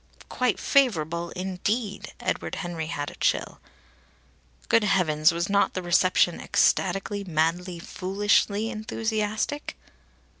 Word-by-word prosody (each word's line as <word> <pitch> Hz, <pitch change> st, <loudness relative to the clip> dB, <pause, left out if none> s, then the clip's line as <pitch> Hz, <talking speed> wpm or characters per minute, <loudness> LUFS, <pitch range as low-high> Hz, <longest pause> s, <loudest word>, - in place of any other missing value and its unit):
"Quite 250 Hz, -5 st, 0 dB
favourable," 170 Hz, -, +1 dB
indeed! 195 Hz, +3 st, -3 dB
Edward -, -, -2 dB
Henry 170 Hz, -3 st, -4 dB
had 145 Hz, -3 st, -4 dB
a -, -, -13 dB
chill. -, -, 0 dB, 1.1 s
Good 230 Hz, -, +4 dB
heavens, 160 Hz, -6 st, +3 dB
was 170 Hz, +1 st, -2 dB
not 200 Hz, 0 st, +2 dB
the 185 Hz, -, -3 dB
reception 175 Hz, 0 st, +3 dB
ecstatically, 195 Hz, +2 st, +1 dB
madly, 175 Hz, +1 st, -1 dB
foolishly 205 Hz, +5 st, 0 dB
enthusiastic? 220 Hz, +4 st, -2 dB
190 Hz, 105 wpm, -26 LUFS, 170-210 Hz, 1.1 s, Good